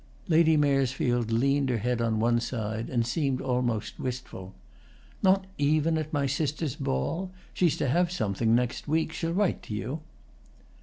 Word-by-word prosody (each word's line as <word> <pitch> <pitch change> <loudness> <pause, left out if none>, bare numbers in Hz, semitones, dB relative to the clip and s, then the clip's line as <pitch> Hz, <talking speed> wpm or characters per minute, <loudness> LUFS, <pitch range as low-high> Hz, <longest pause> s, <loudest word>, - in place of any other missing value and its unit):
Lady 160 -1 +5
Maresfield 130 -4 +1
leaned 135 +4 +2
her 120 - +1
head 120 +2 -1
on 115 -2 +1
one 120 +1 +3
side 110 -2 -3
and 120 -2 +1
seemed 135 +1 0
almost 120 -4 -1
wistful. 120 -7 -6 0.7
"Not 190 0 +4
even 155 +3 +2
at 155 -1 -2
my 145 -2 +1
sister's 145 +1 -1
ball? 165 - -2 0.2
She's 175 -4 +2
to - - 0
have 175 +6 +2
something 110 - +1
next 125 +3 -1
week. 160 +1 0
She'll 165 0 -2
write 195 +2 +1
to 105 - -6
you." 130 +9 -4
130 Hz, 155 wpm, -28 LUFS, 115-155 Hz, 0.7 s, Lady